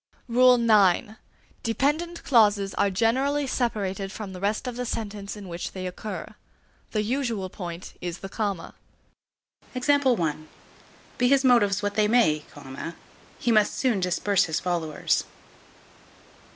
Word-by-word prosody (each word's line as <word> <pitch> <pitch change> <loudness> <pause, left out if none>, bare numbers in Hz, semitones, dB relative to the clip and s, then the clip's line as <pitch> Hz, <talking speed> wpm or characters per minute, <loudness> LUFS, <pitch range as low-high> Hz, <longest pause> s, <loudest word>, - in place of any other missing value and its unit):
IX. 230 -5 +4 0.4
Dependent 295 +9 -1
clauses 205 -6 +3
are 200 - +2
generally 260 +8 +1
separated 200 -7 -2
from 205 -2 -7
the 180 - -8
rest 205 +6 -1
of 250 - -4
the 250 - -3
sentence 210 -3 -5
in 200 -2 -9
which 170 0 -5
they 185 -1 -5
occur. 185 +4 -6 0.6
The 215 -1 -1
usual 230 -5 -2
point 175 -1 -7
is 175 -1 -4
the 195 - -7
comma. 200 -4 -3 1.0
Be 245 - -1
his 275 +1 +4
motives 210 -6 +4
what 205 0 -1
they 210 0 +2
may, 210 -10 +3 0.9
he 240 - 0
must 215 -2 +3
soon 245 -7 +1
disperse 185 +2 +1
his 160 -2 -1
followers. 170 -4 0
210 Hz, 125 wpm, -26 LUFS, 190-245 Hz, 1.0 s, IX